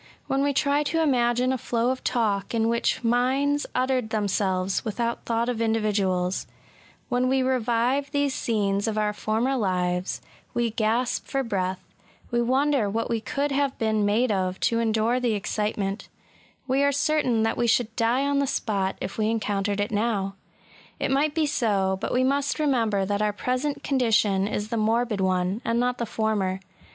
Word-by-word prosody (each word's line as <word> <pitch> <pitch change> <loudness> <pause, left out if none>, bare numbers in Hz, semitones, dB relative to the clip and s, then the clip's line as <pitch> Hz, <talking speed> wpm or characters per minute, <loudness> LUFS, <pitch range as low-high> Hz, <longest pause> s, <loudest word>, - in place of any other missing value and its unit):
When 270 0 0
we 285 0 +2
try 280 +1 +2
to 325 +2 0
imagine 250 -2 +2
a 260 - -2
flow 235 +2 0
of 260 - -5
talk 215 -2 0
in 225 0 +2
which 235 +1 0
minds 265 +5 +1
uttered 255 -2 0
themselves 195 -3 0
without 235 +2 -2
thought 230 0 0
of 240 -2 -2
individuals; 200 -5 0 0.3
— - - -29
when 250 0 +1
we 265 0 +2
revive 255 +2 +1
these 285 -1 0
scenes 205 -4 0
of 220 -1 -1
our 210 -1 +1
former 225 +6 0
lives, 180 -4 -1 0.4
we 235 -1 +1
gasp 225 +3 0
for 275 -1 -1
breath, 190 -5 -2 0.3
— - - -27
^we 240 0 +2
wonder 265 -2 +2
what 230 +3 -2
we 230 -1 0
could 280 +5 -2
have 275 -1 0
been 220 -1 +1
made 215 +4 +2
of 185 -1 -1
to 230 -2 +2
endure 225 +2 +1
the 245 -3 +1
excitement; 205 -1 -2 0.3
— - - -32
we 265 +1 +2
are 280 0 +3
certain 280 -5 +1
that 225 - +1
we 240 - 0
should 225 -1 +1
die 245 +4 +1
on 280 0 +1
the 280 - +1
spot 195 -6 -1
if 195 - -5
we 215 0 +2
encountered 205 -2 -1
it 205 +1 -1
now. 205 -2 0 0.7
It - - -1
might 290 +2 +1
be 320 -2 +2
so: 200 -9 0
but - - -2
we 255 - +2
must 280 +2 +1
remember 230 -10 +1
that 205 +1 -1
our 210 -1 +1
present 255 +7 -2
condition 220 -7 +2
is 210 0 -3
the 230 - -2
morbid 225 -1 +1
one, 185 +3 0
and 230 +1 0
not 245 0 0
the 235 - -2
former. 205 -4 -1
230 Hz, 185 wpm, -25 LUFS, 205-255 Hz, 0.7 s, are